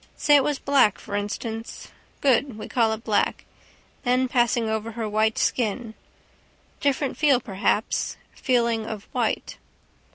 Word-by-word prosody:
Say 295 -1 +4
it 280 - +5
was 290 0 0
black, 270 -8 +3
for 205 - -7
instance. 220 +2 -5 0.3
Good. 265 -3 +2
We 215 - -7
call 230 -3 +2
it 220 +1 -7
black. 215 -3 0 0.6
Then 255 0 +2
passing 240 -2 +2
over 220 +1 -2
her 225 -1 -3
white 215 +1 +1
skin. 225 -1 -1 0.9
Different 280 -1 0
feel 285 -5 +4
perhaps. 205 -1 -1 0.2
Feeling 235 -4 0
of 210 -2 -5
white. - - -2
230 Hz, 135 wpm, -24 LUFS, 220-260 Hz, 0.9 s, it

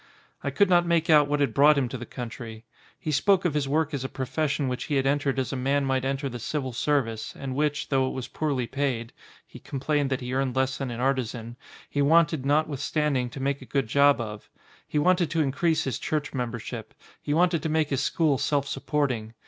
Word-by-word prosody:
I - - 0
could 200 - +3
not 175 -1 +4
make 165 -1 +2
out 150 -2 +6
what 145 0 0
had 135 -6 +1
brought 145 +1 +6
him 135 -3 +1
to 130 - -5
the 120 - -7
country. 115 -2 -7 0.3
He 155 - -3
spoke 185 +6 +3
of 170 - +1
his 145 -2 0
work 155 +2 0
as 135 -2 -2
a 130 - -3
profes 140 +4 -2
sion 140 -1 -1
which 125 -1 -3
he 145 - -1
had 135 -1 +1
entered 140 -1 +1
as 130 0 -1
a - - -1
man 135 +2 +1
might 130 -1 0
enter 135 +1 -1
the 125 -2 -6
civil, 130 +1 -3
service, 115 -4 -1
and 135 -2 -5
which, 150 +1 -1
though 135 -2 +2
it - - -3
was 130 -2 -5
poorly 140 -5 -1
paid 125 -3 -2 0.3
(he - - -13
complained 145 +1 -1
that 130 -1 -1
he 125 0 -4
earned 130 -1 0
less 130 0 0
than 135 -2 -3
an 120 -1 -5
artisan) 120 -3 -1 0.3
he 145 - -1
wanted 155 -2 +3
notwithstanding 145 -2 +1
to 130 - -8
make 140 +1 -1
a - - -9
good 135 0 0
job 140 +4 +4
of. 105 -2 -6 0.4
He - - -2
wanted 175 +2 +3
to 160 +1 +1
increase 155 +3 +1
his 130 -5 -3
church 150 -1 -2
membership, 120 -3 -5 0.3
he 145 - -1
wanted 175 -1 +3
to 160 - -2
make 155 -1 +1
his 135 - +1
school 150 -6 +1
self 140 -2 0
supporting. 135 -6 -2
140 Hz, 225 wpm, -26 LUFS, 130-150 Hz, 0.4 s, out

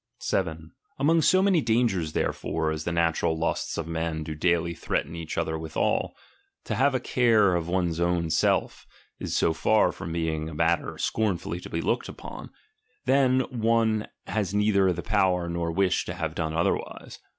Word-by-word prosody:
7. 80 -3 -2 0.3
Among 160 +4 +3
so 185 +4 +4
many 190 -5 +3
dangers 110 - +1
therefore, 80 -1 -1
as 80 0 -4
the 85 - -1
natural 85 -1 +1
lusts 80 - -2
of 85 - -2
men 80 -1 -2
do 80 0 -5
daily 85 +1 +1
threaten 80 0 -3
each 85 -2 -6
other 80 0 -1
withal, 80 -1 -1 0.5
to - - -3
have 135 +1 +2
a - - +2
care 115 -6 +3
of 85 -2 -1
one's 85 -2 0 0.3
self - - 0 0.3
is - - -2
so 80 - +2
far 105 +7 +3
from 80 - -7
being 80 -1 -2
a 80 - -8
matter 80 0 0
scornfully 95 -5 -1
to - - -10
be 85 - -2
looked - - -1
upon, - - -9 0.6
that 130 -1 +3
one 115 -2 +1 0.2
has 100 -2 -2
neither 100 -2 +3
the 85 0 -4
power 95 -4 +1
nor 85 -1 -2
wish 95 +1 +1
to 90 - -5
have 80 -4 -3
done 80 -1 -3
otherwise. 85 - -2
85 Hz, 170 wpm, -26 LUFS, 80-110 Hz, 0.6 s, so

